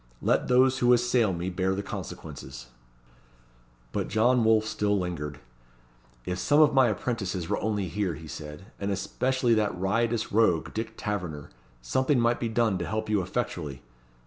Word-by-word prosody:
Let - - +2
those 130 +1 +4
who 125 0 +5
assail 120 -3 +3
me 90 +1 -3
bear 95 +1 0
the 100 - -3
consequences." 60 -9 -8 1.2
But - - -2
John 120 +3 +3
Wolfe 110 -1 +4
still 105 -1 0
lingered. 75 -5 -4 0.9
"If 90 0 -3
some 145 +1 +3
of 155 -2 +6
my 130 -2 +5
apprentices 100 -5 -2
were - - 0
only 105 -3 -1
here," 95 -1 -2
he 80 +1 -10
said, 75 +3 -8
"and 100 - -2
especially 120 +5 0
that 105 -4 +1
riotous 115 +4 0
rogue, 100 -7 +2
Dick 115 0 -4
Taverner, 90 -9 -4 0.3
something 130 - +1
might 120 0 +2
be 115 - -1
done 110 -4 +1
to 85 - -3
help 110 0 -2
you 105 -2 +2
effectually. 85 - -4
105 Hz, 160 wpm, -27 LUFS, 90-120 Hz, 1.2 s, of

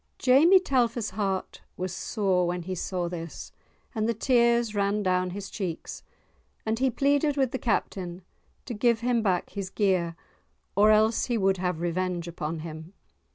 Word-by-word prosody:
Jamie 305 +9 +6
Telfer's[#] 240 - 0
heart 195 -1 -3 0.2
was 185 0 -3
sore 190 -4 0
when 175 0 -2
he 185 +2 -4
saw 180 0 -2
this, 170 -2 -7 0.4
and 220 -1 0
the 230 - 0
tears 235 -1 +3
ran 205 0 0
down 185 -1 +1
his 195 +2 -6
cheeks, 180 -6 -5 0.6
and 220 +1 -1
he 265 0 +3
pleaded 285 +3 +1
with 265 -3 +2
the 260 - -3
Captain 185 -5 -2 0.4
to 245 - -5
give 235 +1 +2
him 240 -1 +1
back 185 -5 0
his 195 -2 -5
gear, 185 -5 +1 0.6
or 205 +2 +5
else 215 +1 +4
he 240 -2 0
would 195 -2 +2
have 180 -2 -2
revenge 175 0 -2
upon 160 -1 -4
him. 160 +2 -8
200 Hz, 160 wpm, -27 LUFS, 180-235 Hz, 0.6 s, Jamie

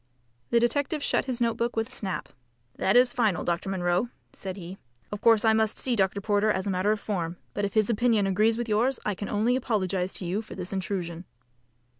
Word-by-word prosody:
The 235 - +4
detective 285 +5 0
shut - - +1
his 255 -2 -2
note 235 -1 +1
book 235 +1 -1
with 225 +1 -1
a - - -11
snap. 195 -6 -4 0.5
"That 195 - +2
is 245 0 +5
final, 220 -7 +1
Dr. 175 +3 -1
Munro," 180 +3 0 0.2
said 190 0 -6
he. 185 +1 -8 0.3
"Of 205 - -5
course 225 -1 +5
I 220 - +5
must 220 0 +2
see 250 -2 +1
Dr. 195 -1 +1
Porter 205 +1 +1
as 190 -3 0
a 200 - 0
matter 185 +3 +1
of 215 - 0
form, 175 -5 -3 0.2
but 205 - -1
if 200 - -5
his 215 -2 +4
opinion 230 -2 +2
agrees 215 +4 +2
with 240 0 -3
yours 230 +5 +1
I 210 - +1
can 205 +2 -6
only 220 +4 +2
apologise 190 -7 0
to 185 - -3
you 185 +5 -1
for 220 - -10
this 185 +1 -5
intrusion." 185 -3 -3
210 Hz, 220 wpm, -27 LUFS, 190-230 Hz, 0.5 s, is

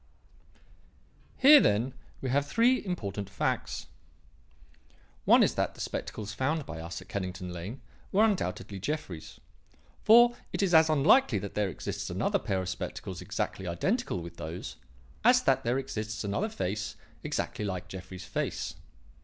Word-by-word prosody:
"Here, 290 +2 +9
then, 115 - +2 0.3
we 130 - -2
have 140 +2 +2
three 240 - +3
important 100 - -4
facts. 100 - -2 1.4
One - - +7
is - - +2
that - - -1
the - - -15
spectacles 105 -1 -4
found 145 +6 -1
by 80 - -7
us 85 +3 -6
at - - -24
Kennington 90 -2 -4
Lane 95 +10 -7 0.3
were 205 +3 +4
undoubtedly 100 - -2
Jeffrey's; 90 - -5 0.6
for 240 +2 +7 0.2
it - - 0
is 185 -3 +1
as 160 0 +7
unlikely 155 - +5
that 100 +1 -5
there 105 -2 0
exists 85 - -5
another - - 0
pair 95 -1 -1
of 90 - -4
spectacles 95 - -5
exactly 95 - -3
identical 140 - -1
with 85 0 -10
those 80 +3 -6 0.5
as 250 +2 +6
that 135 0 +3
there 120 +2 +1
exists 110 -4 -4
another 105 - -1
face 105 - -3 0.3
exactly - - -2
like 95 -3 -3
Jeffrey's 95 0 -8
face. - - -3
105 Hz, 145 wpm, -29 LUFS, -, 1.4 s, Here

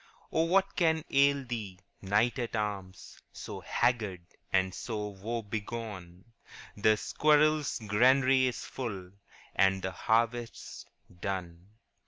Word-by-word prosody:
* - - -28
Ah, 160 - +3
what 195 +3 +2
can 160 -3 +2
ail 140 0 +3
thee, 110 -6 -5 0.2
wretched 115 +5 0
wight, 100 -3 -4
So - - -7
haggard 110 -7 0 0.3
and 95 -1 +2
so 105 -1 -4
woe 110 +4 -4
begone? 105 -4 -6 0.5
The 110 +1 +3
squirrel's 150 +3 +2
granary 130 +5 +4
is 125 - -4
full, 100 -8 -6 0.4
And 95 0 +3
the 95 - -2
harvest 115 +4 0
's - - -10 0.3
done. 90 -2 -5
110 Hz, 120 wpm, -30 LUFS, 95-130 Hz, 0.5 s, granary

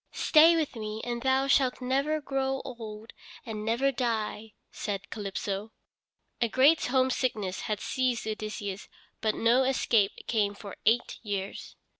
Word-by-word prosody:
"Stay 325 +2 +6
with 310 -5 -1
me, 215 -1 -5
and 240 -1 -3
thou 265 +1 +2
shalt 270 -2 +3
never 275 +4 0
grow 270 -2 -1
old 225 -3 -8 0.3
and 215 -3 -5
never 235 +5 +1
die," 225 -3 -2 0.2
said 200 -1 -5
Calypso. 205 0 -4 0.7
A 235 - +2
great 280 +7 +4
homesickness 250 -6 0
had 210 -2 -1
seized 255 -4 -1
Odysseus, 210 -2 -5 0.3
but 220 -1 +1
no 235 +3 +4
escape 230 -6 +2
came 205 -3 0
for 200 -1 -9
eight 235 +2 +2
years. 200 -3 -5
230 Hz, 135 wpm, -29 LUFS, 210-265 Hz, 0.7 s, Stay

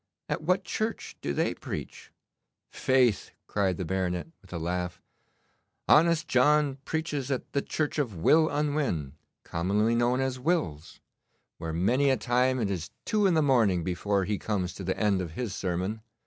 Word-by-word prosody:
'At - - -2
what 185 +4 +1
church 220 +5 -3
do - - -2
they - - 0
preach?' - - -7 0.6
'Faith!' 130 -5 +2 0.2
cried 95 -4 0
the 90 - -3
baronet, 90 - -2
with 95 - -19
a 90 - -3
laugh, 90 +1 -3 0.9
'honest 165 0 +5
John 140 +2 +3
preaches 150 -4 -2
at 130 -2 -3
the 140 - +2
church 155 +1 -2
of 120 -9 -1
Will 155 - +4
Unwin, 145 - -1 0.3
commonly 100 +7 +1
known 120 +2 +2
as 130 -1 -1
Will's, 125 - -1 0.6
where 80 - -4
many 120 - +2
a 130 - +3
time 125 +3 +1
it 105 -4 0
is 85 -4 -3 0.2
two 210 -3 +2
in 180 - +3
the 155 - +4
morning 110 - +3
before 95 +2 0
he 105 0 -1
comes 100 -4 -2
to 95 - -8
the 95 +1 -2
end 100 -3 +2
of 85 -3 -5
his 115 +1 -3
sermon. 95 +2 -2
115 Hz, 165 wpm, -28 LUFS, 90-145 Hz, 0.9 s, honest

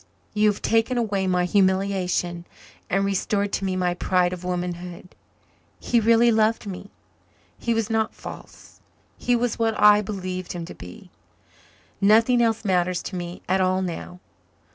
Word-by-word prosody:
You 210 0 +3
have 205 - -4
taken 225 +2 +1
away 200 -5 0
my 180 -1 +1
humiliation 185 -2 0 0.4
and 195 +1 +1
restored 200 +1 -1
to 195 - -1
me 190 -1 -1
my 180 -1 0
pride 180 0 +1
of 180 0 -7
womanhood. 180 0 -5 0.7
He 240 - +1
really 230 +1 +4
loved 220 0 +2
me 200 0 -7 0.7
he 235 -1 0
was 225 -2 0
not 225 -1 -1
false - - -12 0.3
he 245 - 0
was 240 -1 -1
what 225 -1 0
I 210 0 +7
believed 185 -3 -5
him 170 -2 -5
to - - -9
be. 90 0 -12 0.9
Nothing 225 +4 +5
else 225 -1 +1
matters 180 -2 +1
to 190 - -6
me 175 0 -6
at 190 +1 +2
all 185 0 +1
now. 180 0 -6
195 Hz, 155 wpm, -24 LUFS, 180-220 Hz, 0.9 s, I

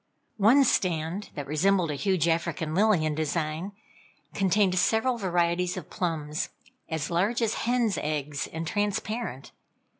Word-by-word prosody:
One 230 +7 +6
stand, 180 -3 0
that 145 - -4
resembled 170 +3 +2
a - - -2
huge 180 +2 +1
African 165 -1 -1
lily 195 -3 +3
in 155 - 0
design, 155 +4 -2 0.6
contained 195 0 +2
several 230 +6 +2
varieties 175 -1 0
of - - -8
plums, 155 -2 -2 0.4
as 160 -2 -3
large 195 +8 +1
as 225 -2 +1 0.2
hen's 240 -4 +1
eggs, 150 -1 -2
and 165 +1 -5
transparent. 205 - -2
175 Hz, 130 wpm, -27 LUFS, 155-205 Hz, 0.6 s, One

